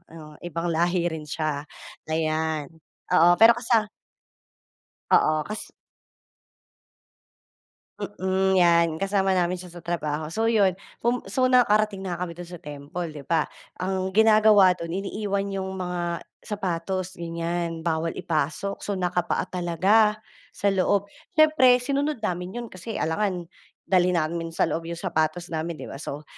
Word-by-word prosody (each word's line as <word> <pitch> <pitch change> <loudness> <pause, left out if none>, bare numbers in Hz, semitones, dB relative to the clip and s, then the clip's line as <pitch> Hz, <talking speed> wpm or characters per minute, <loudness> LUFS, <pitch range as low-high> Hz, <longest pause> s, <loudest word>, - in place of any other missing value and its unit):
o 150 -2 -12
ibang 170 0 -3
lahi 175 +1 +1
rin 155 -1 -6
siya, 150 -1 -3 0.4
ayan 155 -1 -1 0.4
oo, 175 0 +6
pero 225 +1 +8
kasa 230 -2 +2 1.3
oo, 155 0 +4
kas 215 0 -5 2.3
mm, 190 -1 0
'yan, 170 -1 +5
kasama 195 0 +1
namin 175 0 +1
siya 180 0 -9
sa 175 - -12
trabaho. 155 -3 -2
So 225 +2 +1
'yon, 200 -5 +4 0.2
pum 240 +1 0
so 255 +6 +2
nakarating 215 -5 +3
na 185 -2 -4
nga 180 - -2
kami 170 - -7
do'n 175 +1 -9
sa 175 - -8
temple, 150 +3 -6
'di 150 - -8
ba, 165 -2 +3 0.3
ang 190 +1 -1
ginagawa 215 -2 +6
do'n 170 -2 -7
iniiwan 200 +2 -2
'yong 190 -1 -3
mga 175 -2 -3 0.2
sapatos, 185 -2 -3
ganiyan, 170 0 -3
bawal 165 0 0
ipasok, 160 +5 -2
so 200 -1 -3
nakapaa 180 -1 0
talaga, 190 +5 +2 0.3
sa 200 -1 0
loob. 195 +1 +2 0.3
Siyempre 305 -5 +6
sinunod 280 +3 -1
namin 180 -1 -3
'yon 240 -1 -5
kasi 185 +5 -6
alangan 180 +2 -1 0.4
dalhin 180 -1 +3
namin 165 +1 -1
sa 165 - +1
loob 165 0 -3
'yong 170 - -4
sapatos 170 +3 -1
namin, 160 +1 -2
'di - - -7
ba, 140 - -8
so, 145 -1 -6
180 Hz, 140 wpm, -25 LUFS, 165-200 Hz, 2.3 s, pero